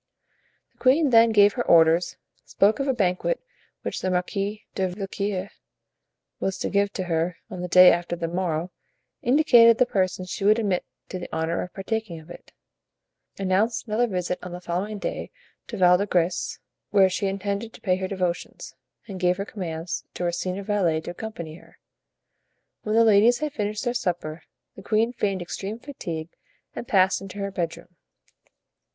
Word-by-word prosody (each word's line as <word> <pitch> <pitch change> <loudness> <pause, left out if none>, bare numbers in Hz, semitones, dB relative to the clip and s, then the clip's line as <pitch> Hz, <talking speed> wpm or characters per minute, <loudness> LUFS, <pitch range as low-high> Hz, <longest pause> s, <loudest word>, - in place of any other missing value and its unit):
The - - -39
queen 275 +2 +4
then 230 0 +7
gave 205 -1 +5
her 245 - -1
orders, 165 +1 +4 0.3
spoke 205 +5 +2
of 275 - -1
a - - +3
banquet 195 - 0 0.4
which - - -4
the 185 - -1
Marquis 195 +3 -2
de 190 -1 0
Villequier 195 +1 -4 0.9
was 190 -1 -2
to - - -3
give 200 0 +2
to 185 - -3
her 170 0 -1
on 185 -2 -6
the 180 - -3
day 180 +1 +8
after 175 0 -1
the 170 -1 -3
morrow, 175 -1 -2 0.5
indicated 240 -4 +6
the 250 - +4
persons 185 -4 -1
she - - -4
would 210 +2 +5
admit 200 -5 0 0.3
to 185 - -5
the 175 - -7
honor 160 +1 -1
of 180 - -6
partaking 200 -3 -3
of 160 +2 -14
it, - - -13 0.9
announced 200 +4 0
another 235 +2 +1
visit 180 -3 -2
on 180 -1 -8
the 175 - -6
following 185 +5 -3
day - - -4 0.4
to 225 - -6
Val 180 -1 +5
de 200 - -1
Grace, 175 -1 0 0.3
where 195 -2 +5
she 190 +2 -1
intended 200 +3 -3
to - - -14
pay 185 -2 +1
her 190 0 -3
devotions, 180 -3 -4 0.3
and 195 -4 -7
gave 180 0 +2
her 200 - -3
commands 165 -5 -5
to - - -4
her 175 - +1
senior 185 +3 -3
valet 190 -6 +1
to 165 - -6
accompany 170 -5 -7
her. - - -20 1.0
When 215 0 -2
the 230 0 +6
ladies 220 +3 +5
had 305 0 -3
finished 210 +1 -3
their 240 -2 0
supper 175 -9 -3 0.3
the - - -10
queen 220 +4 +1
feigned 195 -6 -1
extreme 195 +5 -5
fatigue 170 - -6 0.4
and 240 - -6
passed 190 -1 +3
into 195 0 -9
her 200 0 -3
bedroom. 170 -1 -5
190 Hz, 175 wpm, -25 LUFS, 180-215 Hz, 1.0 s, day